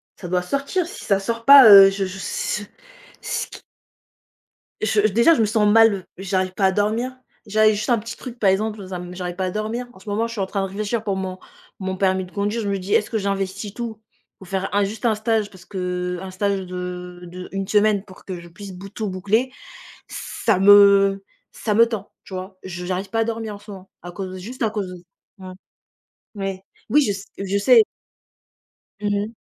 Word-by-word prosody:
ça 180 - -8
doit 180 +1 +1
sortir. 280 - -1
Si 410 - -9
ça 195 -1 +2
sort 230 +3 -4
pas 275 -4 +10
heu, 195 -1 +10
je 195 0 -2
je, 185 0 -7
si 205 +1 -3
ce - - -10 0.6
ce - - -2
qui - - -12 1.2
Je 215 0 +1
déjà, 235 +10 +5
je 300 - 0
me 220 - +4
sens 210 0 +2
mal, 220 -4 +5
j'arrive 190 -1 -1
pas 195 - +1
à 190 - +4
dormir. 220 +6 -1 0.3
J'avais 215 +1 +4
juste 215 +3 -3
un 240 - +4
petit 230 +2 -8
truc, 245 -2 -9
par 200 - +4
exemple, 210 +2 0
dans 190 -1 -8
un, 180 - -4
hem, 180 0 -9
j'arrive 180 -1 -5
pas 185 0 -2
à 180 - -2
dormir. 220 +4 -3
En - - -17
ce 205 - -10
moment, 220 +3 0
je 230 - -8
suis 215 - -3
en 190 - +1
train 200 +1 -2
de 195 - -2
réfléchir 210 +3 -3
pour 200 -3 -1
mon 190 -1 -4 0.4
mon 190 0 -3
permis 190 -1 +1
de 180 - -16
conduire. 205 +3 -1
Je 205 - -3
me 200 - 0
dis: 190 +2 -3
«Est-ce 210 - +2
que 225 - -1
j'investis 195 0 -3
tout, 225 -3 -6 0.4
pour 190 - -14
faire 190 +1 -3
un 205 - +4
juste 205 +3 -4
un 220 -2 +3
stage?» 215 -1 0
Parce 185 -3 -15
qu'un 180 0 -4
stage 195 0 -1
de, 180 - -8 0.5
heu, 180 +1 -9
d'1 195 0 -3
semaine 210 -1 +3
pour 190 -3 -16
que 185 -2 -6
je 170 0 -13
puisse 195 +2 -10
bout 195 +2 -10
tout 215 0 -4
boucler, 210 +7 0 0.6
ça 210 -5 -1
me 200 0 +6 0.3
ça 215 - -2
me 230 +2 +6
tend. 215 -4 -6
Tu - - -11
vois? 185 +1 -7
J 180 -1 -6
j'arrive 190 +1 -3
pas 225 - -1
à 225 - +4
dormir 225 -2 -4
en 200 - -12
ce 210 +1 -12
moment, 190 -1 -11
à 175 - -8
cause 185 +1 -6
de 185 - -7
juste 235 +7 -6
à 220 - +2
cause 205 -3 -3
de 180 -1 -10 0.4
mmh. 185 -1 -9 0.8
Ouais. 195 -1 -4 0.3
Oui 295 +4 +5
je 255 - 0
s 195 0 -8
je 195 0 -1
sais. 225 +2 +6 1.2
Mmh 205 - -1
mh. 205 0 0
200 Hz, 225 wpm, -22 LUFS, 190-220 Hz, 1.2 s, pas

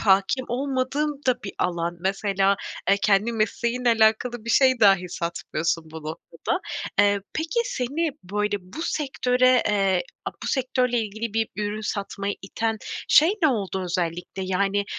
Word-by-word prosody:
hâkim 195 +4 +3
olmadığın 275 +3 -1
da 255 -1 +2
bir 195 - -6
alan. 175 -1 -1
Mesela, 195 +1 +1 0.3
e, 200 - +5
kendi 205 +2 +2
mesleğinle 235 +3 0
alakalı 225 +1 +2
bir 235 - -2
şey 260 -1 +4
dahi 195 -4 +5
satmıyorsun 170 -1 -2
bu 160 0 -8
noktada. 155 +1 -4 0.4
Eee, 205 0 +4
peki, 325 +9 0
seni, 315 - -1
böyle, 210 +2 -1
bu 185 - -8
sektöre, 255 -5 +2
eee, 195 -3 +2 0.2
a - - -2
bu - - -4
sektörle 250 -2 +1
ilgili 220 +1 -4
bir 225 -1 +1
ürün 210 0 -2
satmaya 200 -1 -3
iten 225 +3 -2 0.3
şey 320 +5 +6
ne 310 - +6
oldu 195 -6 -1
özellikle? 175 +1 -3
Yani, 195 +2 +1
210 Hz, 145 wpm, -24 LUFS, 195-250 Hz, 0.4 s, şey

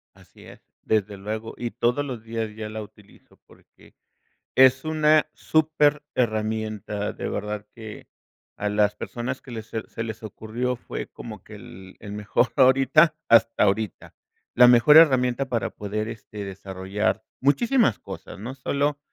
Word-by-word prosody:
Así - - -19
es, - - -14 0.2
desde 105 -2 0
luego, 110 +3 -5
y 120 -1 -4
todos 120 +6 0
los 125 -5 -6
días 115 -1 -4
ya 110 -1 -5
la 110 0 -6
utilizo, 105 -1 -18
porque, - - -22 0.6
es 130 +1 +6
una 155 -1 +3
súper 150 -2 +2
herramienta 110 -2 -2
de - - -5
verdad 105 0 -4
que, 110 -2 -10 0.5
a 105 - -2
las 105 0 +2
personas 125 +2 -5
que 130 - -13
les 110 -1 -7
se 110 -1 -5
se 115 - -5
les 110 -1 -6
ocurrió 110 +4 -4
fue 120 - -7
como - - -10
que - - -12
el 95 0 -12
el 105 -1 -9
mejor, 105 +4 0
ahorita 135 +4 +5
hasta 115 0 +5
ahorita. 105 0 -1 0.4
La 125 0 +8
mejor 125 +5 +7
herramienta 130 -4 +4
para 120 -3 -1
poder 105 +2 -4
este, 105 -2 -8
desarrollar, 100 +2 -3 0.2
muchísimas 145 - +2
cosas, - - -9
no 115 +6 -6
solo 140 +2 -1
115 Hz, 150 wpm, -24 LUFS, 105-130 Hz, 0.6 s, La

